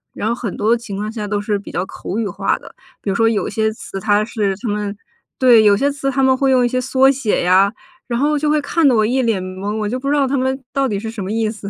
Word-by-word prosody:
然 215 Hz, -, -2 dB
后 230 Hz, -, +1 dB
很 235 Hz, -5 st, -5 dB
多 220 Hz, +3 st, +3 dB
情 230 Hz, -4 st, -7 dB
况 210 Hz, +2 st, -3 dB
下 215 Hz, -2 st, -5 dB
都 205 Hz, 0 st, -1 dB
是 205 Hz, -1 st, -1 dB
比 -, -, -10 dB
较 180 Hz, -, -2 dB
口 190 Hz, -, -6 dB
语 225 Hz, -3 st, -1 dB
化 175 Hz, -, -1 dB
的， -, -, -14 dB, 0.3 s
比 200 Hz, -, -2 dB
如 195 Hz, -, -2 dB
说 225 Hz, +1 st, +3 dB
有 215 Hz, -, -1 dB
些 220 Hz, +1 st, 0 dB
词 195 Hz, -2 st, -8 dB
它 210 Hz, +1 st, +2 dB
是 210 Hz, -4 st, -1 dB
他 240 Hz, -, -6 dB
们 205 Hz, -1 st, -3 dB, 0.4 s
对， 245 Hz, -4 st, +6 dB
有 200 Hz, -1 st, +5 dB
些 285 Hz, +4 st, +1 dB
词 275 Hz, -1 st, -2 dB
他 270 Hz, 0 st, 0 dB
们 260 Hz, 0 st, +4 dB
会 270 Hz, 0 st, +1 dB
用 255 Hz, -2 st, +4 dB
一 -, -, +3 dB
些 255 Hz, +1 st, -1 dB
缩 265 Hz, +1 st, +4 dB
写 255 Hz, -9 st, -1 dB
呀， 190 Hz, +3 st, +4 dB, 0.4 s
然 235 Hz, -1 st, -1 dB
后 300 Hz, +2 st, +2 dB
就 300 Hz, +1 st, 0 dB
会 305 Hz, 0 st, +3 dB
看 305 Hz, +1 st, +2 dB
得 250 Hz, -, +4 dB
我 215 Hz, -1 st, +3 dB
一 260 Hz, +3 st, +1 dB
脸 220 Hz, -6 st, 0 dB
蒙， 190 Hz, +3 st, -4 dB
我 210 Hz, -1 st, -2 dB
就 250 Hz, +4 st, -2 dB
不 275 Hz, -, -5 dB
知 295 Hz, -, +2 dB
道 280 Hz, -, +3 dB
他 275 Hz, -, -1 dB
们 265 Hz, +1 st, 0 dB
到 275 Hz, -1 st, +1 dB
底 200 Hz, -2 st, -2 dB
是 220 Hz, +1 st, -5 dB
什 215 Hz, -4 st, -6 dB
么 195 Hz, -, -4 dB
意 220 Hz, -1 st, 0 dB
思， 205 Hz, -3 st, -8 dB
225 Hz, 320 characters per minute, -18 LUFS, 205-260 Hz, 0.4 s, 对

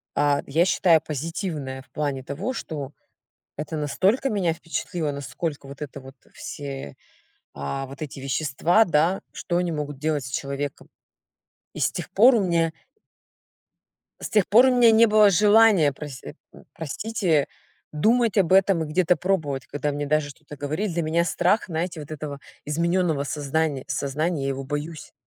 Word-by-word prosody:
а, 145 Hz, -1 st, +2 dB
я 160 Hz, +5 st, +3 dB
считаю 175 Hz, -3 st, +4 dB
позитивное 150 Hz, -3 st, -4 dB
в -, -, -22 dB
плане 140 Hz, -3 st, -2 dB
того, 150 Hz, -, -4 dB
что 150 Hz, -, -6 dB, 0.7 s
это 155 Hz, +2 st, -4 dB
настолько 190 Hz, -, +1 dB
меня 190 Hz, -7 st, +1 dB
впечатлило, 165 Hz, -1 st, -3 dB
насколько 140 Hz, +2 st, -5 dB
вот 140 Hz, +1 st, -11 dB
это 140 Hz, -1 st, -6 dB
вот, 135 Hz, +1 st, -13 dB, 0.2 s
все, 135 Hz, -, -7 dB, 0.6 s
а, 70 Hz, -, -4 dB
вот 135 Hz, +3 st, -12 dB
эти 145 Hz, -2 st, -6 dB
вещества, 150 Hz, -, +2 dB
да, 170 Hz, +3 st, +2 dB
что 175 Hz, -, -2 dB
они 175 Hz, -1 st, 0 dB
могут 145 Hz, -3 st, -4 dB
делать 150 Hz, -2 st, -1 dB
с -, -, -6 dB
человеком. 140 Hz, +1 st, -4 dB, 0.9 s
И -, -, -8 dB
с -, -, +2 dB
тех -, -, -6 dB
пор 240 Hz, +6 st, +6 dB
у 210 Hz, -, +2 dB
меня 165 Hz, -2 st, +1 dB, 1.5 s
С -, -, -5 dB
тех 210 Hz, -4 st, +3 dB
пор 240 Hz, +5 st, +7 dB
у -, -, +5 dB
меня 240 Hz, -2 st, +7 dB
не 225 Hz, +1 st, +6 dB
было 215 Hz, -1 st, +6 dB
желания 205 Hz, -5 st, +5 dB
прось 135 Hz, -1 st, -9 dB
э, -, -, -9 dB, 0.2 s
м, -, -, -16 dB
простите, 165 Hz, -1 st, -1 dB, 0.5 s
думать 225 Hz, +7 st, +2 dB
об 185 Hz, -3 st, +3 dB
этом 190 Hz, -3 st, +4 dB
и -, -, -6 dB
где-то 180 Hz, +3 st, +2 dB
пробовать, 160 Hz, -8 st, -1 dB
когда 145 Hz, +1 st, -2 dB
мне 145 Hz, 0 st, -3 dB
даже 150 Hz, 0 st, +1 dB
что-то 145 Hz, 0 st, -13 dB
говорили. 155 Hz, +8 st, -2 dB
Для 170 Hz, 0 st, -1 dB
меня 165 Hz, +2 st, +1 dB
страх, 175 Hz, +5 st, +1 dB
знаете, 170 Hz, -1 st, -3 dB
вот 150 Hz, -, -10 dB
этого 145 Hz, -2 st, -6 dB, 0.2 s
изменённого 165 Hz, -1 st, 0 dB
сознания 145 Hz, 0 st, -1 dB
сознания. 150 Hz, +3 st, -1 dB
Я 135 Hz, -, -1 dB
его 135 Hz, 0 st, -3 dB
боюсь. 145 Hz, +3 st, -5 dB
155 Hz, 165 wpm, -24 LUFS, 140-180 Hz, 1.5 s, пор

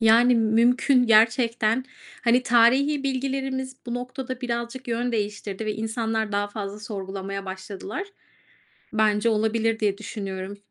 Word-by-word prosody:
Yani, 230 Hz, +2 st, +6 dB
mümkün 240 Hz, +3 st, +3 dB
gerçekten, 230 Hz, +1 st, +3 dB, 0.4 s
hani, 245 Hz, +2 st, +4 dB
tarihi 260 Hz, +5 st, +4 dB
bilgilerimiz 265 Hz, -1 st, -2 dB
bu 240 Hz, -, -3 dB
noktada 255 Hz, +1 st, -5 dB
birazcık 240 Hz, +1 st, -4 dB
yön 240 Hz, +1 st, -1 dB
değiştirdi 210 Hz, -1 st, -3 dB
ve 215 Hz, -, 0 dB
insanlar 220 Hz, -1 st, -2 dB
daha 205 Hz, 0 st, 0 dB
fazla 205 Hz, 0 st, -6 dB
sorgulamaya 195 Hz, -1 st, -5 dB
başladılar. 190 Hz, -, -6 dB, 0.9 s
Bence 215 Hz, +1 st, +3 dB
olabilir 220 Hz, +1 st, +1 dB
diye 200 Hz, -2 st, +1 dB
düşünüyorum. 195 Hz, -2 st, -6 dB
225 Hz, 120 wpm, -25 LUFS, 210-250 Hz, 0.9 s, Yani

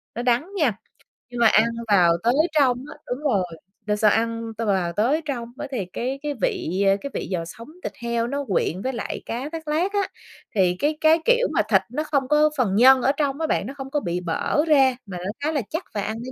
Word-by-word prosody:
nó 240 Hz, -, -2 dB
đắng 250 Hz, +8 st, +1 dB
nha, 255 Hz, -, +1 dB, 0.5 s
nhưng 245 Hz, -1 st, -6 dB
mà 235 Hz, -, +6 dB
ăn 220 Hz, +1 st, +5 dB, 0.2 s
vào 180 Hz, -5 st, +5 dB
tới 240 Hz, +2 st, +3 dB, 0.2 s
trong 260 Hz, -5 st, +3 dB
á, -, -, -11 dB
đúng 245 Hz, -, -3 dB
rồi, 210 Hz, -11 st, +2 dB, 0.4 s
đ 210 Hz, -, -2 dB
sau 210 Hz, -1 st, +4 dB
ăn 230 Hz, 0 st, -1 dB
t -, -, -32 dB
vào 190 Hz, -6 st, 0 dB
tới 265 Hz, -, +1 dB
trong 240 Hz, -5 st, -4 dB
á, 295 Hz, 0 st, -5 dB
thì 220 Hz, -8 st, -2 dB
cái 260 Hz, +3 st, -3 dB
cái 295 Hz, -1 st, -2 dB
vị, 185 Hz, +2 st, 0 dB
ơ, 195 Hz, -, +4 dB
cái 280 Hz, -, -5 dB
vị -, -, -4 dB
giò 170 Hz, -2 st, -2 dB
sống 230 Hz, +7 st, -10 dB, 0.2 s
thịt -, -, -4 dB
heo 235 Hz, 0 st, 0 dB
nó 280 Hz, +2 st, -3 dB
quyện 185 Hz, -2 st, 0 dB
với 260 Hz, +2 st, -2 dB
lại 230 Hz, -, -4 dB
cá 255 Hz, +6 st, -4 dB
thác 325 Hz, -1 st, -7 dB
lác 340 Hz, +7 st, 0 dB
á. 405 Hz, -, +2 dB, 0.6 s
Thì 180 Hz, -2 st, +3 dB
cái 300 Hz, +1 st, 0 dB
cái, 315 Hz, +1 st, +5 dB
kiểu, -, -, +4 dB
mà -, -, +3 dB
thịt -, -, +5 dB
nó 300 Hz, +5 st, -2 dB
không 280 Hz, -4 st, 0 dB
có 300 Hz, +1 st, +4 dB
phần 215 Hz, -7 st, +1 dB
nhân 260 Hz, +4 st, +7 dB
ở 270 Hz, -, +3 dB
trong 285 Hz, 0 st, -2 dB
á 320 Hz, -, 0 dB
bạn, 215 Hz, -, 0 dB
nó 270 Hz, -, -6 dB
không 270 Hz, 0 st, -6 dB
có 295 Hz, -, +1 dB
bị 175 Hz, -4 st, -2 dB
bở 180 Hz, -, 0 dB
ra 270 Hz, -4 st, +5 dB
mà 185 Hz, -3 st, -7 dB
nó 185 Hz, +3 st, -4 dB
khá 310 Hz, -, +1 dB
là 290 Hz, -4 st, 0 dB
chắc 320 Hz, +4 st, -3 dB
và 205 Hz, -, -1 dB
ăn 215 Hz, +2 st, -3 dB
nó 245 Hz, +3 st, -7 dB
245 Hz, 250 wpm, -23 LUFS, 210-295 Hz, 0.6 s, nhân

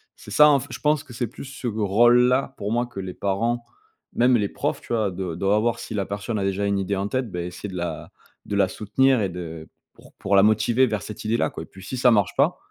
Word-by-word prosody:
C'est -, -, -13 dB
ça, 150 Hz, +8 st, +7 dB
en 140 Hz, -2 st, +4 dB
fait, -, -, -9 dB
je -, -, -6 dB
pense 150 Hz, -1 st, +1 dB
que 125 Hz, -, -13 dB
c'est 120 Hz, +1 st, -2 dB
plus 115 Hz, -, -10 dB
ce 135 Hz, -2 st, -6 dB
rôle-là 120 Hz, +5 st, +3 dB
pour 105 Hz, +2 st, -4 dB
moi 120 Hz, +1 st, 0 dB
que 100 Hz, -, -9 dB
les 95 Hz, -1 st, -5 dB
parents, 115 Hz, +6 st, -1 dB, 0.5 s
même 125 Hz, 0 st, +4 dB
les 100 Hz, -2 st, -1 dB
profs -, -, -3 dB
tu -, -, -12 dB
vois? 110 Hz, -4 st, +1 dB
Doi 90 Hz, -2 st, -4 dB
doivent 100 Hz, +2 st, +2 dB
voir 120 Hz, 0 st, 0 dB
si 120 Hz, -, -7 dB
la 100 Hz, -2 st, -1 dB
personne 100 Hz, +2 st, -3 dB
a -, -, -1 dB
déjà 100 Hz, +1 st, -1 dB
une 100 Hz, -1 st, +1 dB
idée 95 Hz, +1 st, -1 dB
en 100 Hz, +1 st, -2 dB
tête, 130 Hz, +1 st, -2 dB
beh 90 Hz, -2 st, -4 dB
essayer 90 Hz, +3 st, -7 dB
de 95 Hz, -, -8 dB
la 85 Hz, -3 st, -4 dB, 0.4 s
de 100 Hz, -, -3 dB
la 100 Hz, -1 st, +3 dB
soutenir 120 Hz, +6 st, +1 dB
et 100 Hz, -, 0 dB
de 80 Hz, -3 st, -8 dB, 0.2 s
pour -, -, -19 dB
pour 100 Hz, 0 st, 0 dB
la 95 Hz, -, +7 dB
motiver 115 Hz, +4 st, +3 dB
vers 105 Hz, -4 st, -3 dB
cette 105 Hz, -, -8 dB
idée-là, 115 Hz, +2 st, +1 dB
quoi, -, -, -7 dB
et -, -, -10 dB
puis 95 Hz, -1 st, -14 dB
si 130 Hz, -, -5 dB
ça 125 Hz, 0 st, +5 dB
marche 100 Hz, -5 st, +2 dB
pas -, -, +2 dB
105 Hz, 265 wpm, -23 LUFS, 95-120 Hz, 0.5 s, ça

